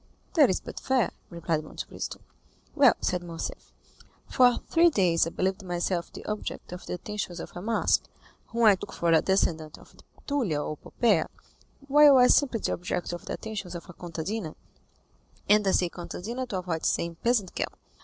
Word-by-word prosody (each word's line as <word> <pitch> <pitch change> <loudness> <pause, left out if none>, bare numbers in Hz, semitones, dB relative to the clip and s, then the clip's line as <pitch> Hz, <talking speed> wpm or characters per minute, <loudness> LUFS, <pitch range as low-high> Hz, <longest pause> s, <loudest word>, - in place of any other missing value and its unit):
"That 300 -6 +6
is 185 - +1
but - - -8
fair," 260 -6 +1 0.2
replied 165 -2 -2
Monte 155 - -7
Cristo. - - -6 0.5
"Well," - - +6
said 180 -1 0
Morcerf, 170 -2 -7 0.6
"for 250 -2 +4
three 340 +1 +5
days 175 - +2
I - - -2
believed 190 +3 -1
myself 175 -1 -2
the - - -10
object 210 -4 -5
of 180 0 -8
the - - -3
attentions 190 -2 -5
of - - -7
a 175 - -6
masque, 225 +4 +1 0.4
whom 235 0 -1
I 215 -2 +8
took 200 +1 -6
for 170 -1 0
a 160 - +5
descendant 160 -5 0
of - - -18 0.3
Tullia 240 - 0
or 155 - -4
Poppæa, 235 +9 +1 0.6
while 290 -1 +7
I 250 - +7
was 250 - +7
simply 250 -6 +1
the - - -1
object 180 0 -3
of 175 - -7
the - - -4
attentions 200 -5 -6
of 170 - -8
a - - -15
contadina, 170 +2 -5 0.9
and 210 -1 +4
I - - +4
say 180 - +2
contadina 215 +9 -6
to 200 - -3
avoid 175 -3 -3
saying 170 -1 0
peasant 230 -6 +1
girl. - - -2
185 Hz, 185 wpm, -27 LUFS, 170-230 Hz, 0.9 s, I